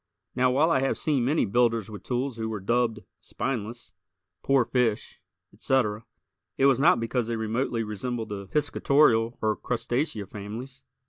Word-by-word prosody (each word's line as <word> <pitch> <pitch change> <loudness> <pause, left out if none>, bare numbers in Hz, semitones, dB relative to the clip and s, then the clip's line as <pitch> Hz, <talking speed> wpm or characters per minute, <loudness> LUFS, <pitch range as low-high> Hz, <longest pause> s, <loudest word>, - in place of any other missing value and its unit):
Now, 130 0 +3
while 145 +6 +3
I 135 - +3
have 135 +1 0
seen 145 -5 +1
many 150 +5 +2
builders 115 0 +1
with 105 - -8
tools 125 0 -2
who 110 0 -3
were 110 -2 -4
dubbed 115 +2 0 0.2
"spineless," 120 -2 -5 0.5
"poor 135 -3 +3
fish," 120 -3 -1 0.3
etc., 115 -5 0 0.5
it 135 - +3
was 135 -2 +4
not 160 0 +5
because 115 0 -1
they 115 - -2
remotely 115 +1 -1
resembled 110 +2 -4
the 100 -1 -6
piscatorial 140 -4 +2
or 110 0 +2
Crustacea 120 -1 -2
families. 115 +7 -8
120 Hz, 150 wpm, -26 LUFS, 110-130 Hz, 0.5 s, not